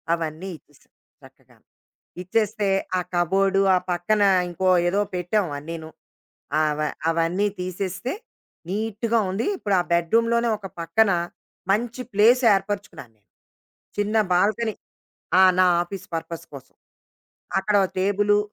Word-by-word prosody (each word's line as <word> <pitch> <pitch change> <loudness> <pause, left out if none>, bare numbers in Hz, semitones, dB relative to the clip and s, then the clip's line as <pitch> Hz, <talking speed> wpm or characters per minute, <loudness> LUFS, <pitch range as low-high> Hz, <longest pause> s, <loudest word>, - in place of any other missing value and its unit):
అవన్నీ 165 +3 -5
ఇచ్చేసాం 145 -2 -28 0.3
చక్కగా. - - -20 0.7
ఇచ్చేస్తే 210 +1 0 0.3
ఆ - - +1
కబోర్డు, 195 +3 +2 0.2
ఆ - - +4
పక్కన 205 +5 +1 0.3
ఇంకో 185 +2 -1 0.2
ఏదో 200 +3 +1
పెట్టాం 180 +3 0
అన్నీను, 160 +2 -7 0.7
ఆహ్, 155 -1 +2
వ - - 0 0.3
అవన్నీ 170 +5 +1
తీసేస్తే 185 +5 -4 0.6
నీట్‌గా 220 +3 -1
ఉంది. 200 +6 -2
ఇప్పుడు 205 - -2
ఆ - - +3
బెడ్‌రూమ్‌లోనే 230 +8 +2
ఒక 200 -2 -8
పక్కన 205 +5 +2 0.6
మంచి 235 +4 -1
ప్లేస్ 230 +5 +5
ఏర్పరుచుకున్నాను 195 - -4
నేను. 105 - -42 0.7
చిన్న 205 +1 -1 0.2
బాల్కనీ 215 +5 +1 0.7
ఆ! - - +8 0.2
నా 185 - +6 0.2
ఆఫీస్ 185 +2 -8
పర్పస్ 165 0 -5
కోసం. 135 - -12 0.8
అక్కడ 205 +2 +1
ఒక 185 - -3
టేబులు 205 +2 +2
195 Hz, 120 wpm, -23 LUFS, 175-210 Hz, 0.8 s, ఆ